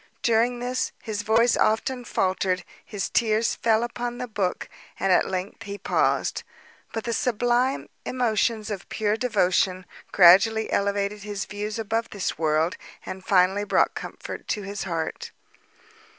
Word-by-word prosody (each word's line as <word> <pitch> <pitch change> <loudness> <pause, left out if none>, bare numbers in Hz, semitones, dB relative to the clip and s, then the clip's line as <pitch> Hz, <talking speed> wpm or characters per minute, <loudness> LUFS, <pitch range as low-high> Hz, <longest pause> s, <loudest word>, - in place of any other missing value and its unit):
During 235 +1 +2
this, 250 +1 -1
his 215 -2 -3
voice 225 +3 +3
often 245 +3 +1
faltered, 185 -2 0 0.2
his 205 -3 -4
tears 225 -1 +1
fell 225 0 +2
upon 240 0 -4
the 250 0 -4
book, 200 -5 -2 0.3
and 195 +1 +1
at 180 - +4
length 190 +4 -4
he 200 -2 -6
paused. 200 - 0 0.5
But 225 - -4
the 235 - -2
sublime 245 +3 +1 0.2
emotions 225 -3 0
of 195 -3 -6
pure 210 -1 0
devotion 185 -5 +1 0.3
gradually 200 +5 +6
elevated 200 +1 0
his 205 -1 -4
views 210 +1 -5
above 225 +1 -2
this 200 -3 -3
world, 160 +4 +1 0.3
and 185 0 -7
finally 190 +1 +3
brought 205 - +2
comfort - - -7
to 210 - -2
his 200 +1 -5
heart. 165 -3 -3
210 Hz, 140 wpm, -25 LUFS, 195-230 Hz, 0.5 s, gradually